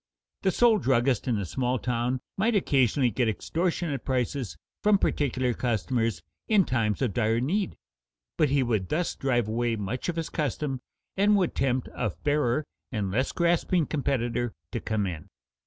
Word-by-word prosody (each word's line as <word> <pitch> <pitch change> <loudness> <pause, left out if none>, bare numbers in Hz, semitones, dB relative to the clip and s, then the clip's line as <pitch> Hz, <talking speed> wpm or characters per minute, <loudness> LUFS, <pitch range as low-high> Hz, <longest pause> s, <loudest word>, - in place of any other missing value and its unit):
The 190 - +2
sole 225 +2 +4
druggist 130 -2 +2
in 120 -4 +1
a 100 - -2
small 125 +7 -1
town 125 +1 -1
might 220 +4 +1
occasionally 135 - +3
get 120 +1 +1
extortionate 165 - -1
prices 125 - -1 0.2
from 210 -1 +5
particular 130 -8 0
customers 115 -4 -1 0.2
in 205 -5 +4
times 115 -2 0
of 120 -6 0
dire 115 -1 +2
need, 185 - -1 0.6
but 155 -3 +3
he 140 -1 +3
would 110 -6 -1
thus 170 +3 0
drive 120 -5 0
away 115 +1 0
much 110 - -3
of 175 - -1
his 165 -1 -3
custom, 140 -3 -2 0.3
and 205 +2 +4
would 185 -4 +1
tempt 130 -1 0
a - - -1
fairer 145 - 0 0.3
and 105 -5 -2
less 130 +7 0
grasping 170 0 +2
competitor 120 -5 -1 0.2
to 120 - -2
come 110 -2 -1
in. 85 -5 -5
130 Hz, 160 wpm, -27 LUFS, 115-155 Hz, 0.6 s, from